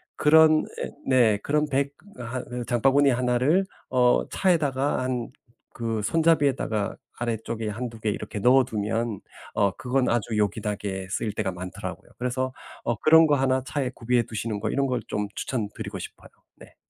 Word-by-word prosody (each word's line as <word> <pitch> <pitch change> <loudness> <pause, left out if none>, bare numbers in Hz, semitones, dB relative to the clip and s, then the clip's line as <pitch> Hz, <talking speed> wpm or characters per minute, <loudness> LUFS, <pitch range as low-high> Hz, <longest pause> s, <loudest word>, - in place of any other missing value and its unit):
그런 155 +1 +5 0.2
예 - - -3 0.2
네 120 -5 +4
그런 150 +1 +1
bag 140 0 0 0.3
한 125 +1 -5 0.2
이 - - -5
장바구니 135 +4 +3
1 125 0 +1
를 160 +10 +3 0.3
어 125 -1 +3
차에다가 145 -7 +1
한 125 -2 -2 0.5
그 115 -2 -2
손잡이에다가 140 -8 +1 0.2
아래쪽에 115 -1 -3
1-2 115 +1 -5
개 110 - -1
이렇게 105 - -6
넣어 125 +5 +5
두면 115 -2 -2 0.3
어 100 -2 +3
그건 125 +4 -1
아주 115 -2 0
요긴하게 105 -2 -2
쓰일 105 +1 -2
때가 105 -3 -1
많더라고요. 90 0 -7
그래서 130 +1 -2 0.3
어 120 - 0
그런 160 +4 +6
거 150 - +2
1 130 -1 +1
차에 135 -1 -2
구비해 120 +1 +1
두시는 110 -1 -4
거 - - -2
이런 140 0 +1
걸 125 -2 -1
좀 105 0 -2
추천드리고 110 -6 -4
싶어요. - - -9 0.3
네. - - -16
125 Hz, 315 characters per minute, -25 LUFS, 110-135 Hz, 0.5 s, 그런